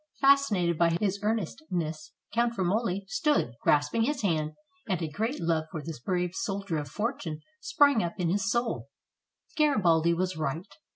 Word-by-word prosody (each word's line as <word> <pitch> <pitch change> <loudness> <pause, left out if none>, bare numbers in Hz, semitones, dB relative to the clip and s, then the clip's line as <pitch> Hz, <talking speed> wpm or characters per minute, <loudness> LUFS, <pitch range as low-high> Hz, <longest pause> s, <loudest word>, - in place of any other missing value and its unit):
Fascinated 225 - +4
by 170 -1 +3
his 200 -1 0
earnestness, 180 - -2 0.2
Count 235 0 +1
Romoli 195 +1 0
stood, 295 - +1
grasping 150 +10 +2
his 270 +2 0
hand, 155 -5 0 0.4
and 185 -3 +1
a 165 - -2
great 220 - -2
love 165 -1 0
for 160 - -5
this 160 -4 -6
brave 180 +5 -1
soldier 200 -6 -2
of 145 - -5
fortune 185 - -3 0.2
sprang 285 -5 +4
up 170 -1 -3
in 180 - 0
his 195 +1 +1
soul. 235 0 -1 0.7
Garibaldi 170 - +3
was 185 +1 -1
right. 155 +2 -2
185 Hz, 155 wpm, -28 LUFS, 165-230 Hz, 0.7 s, Fascinated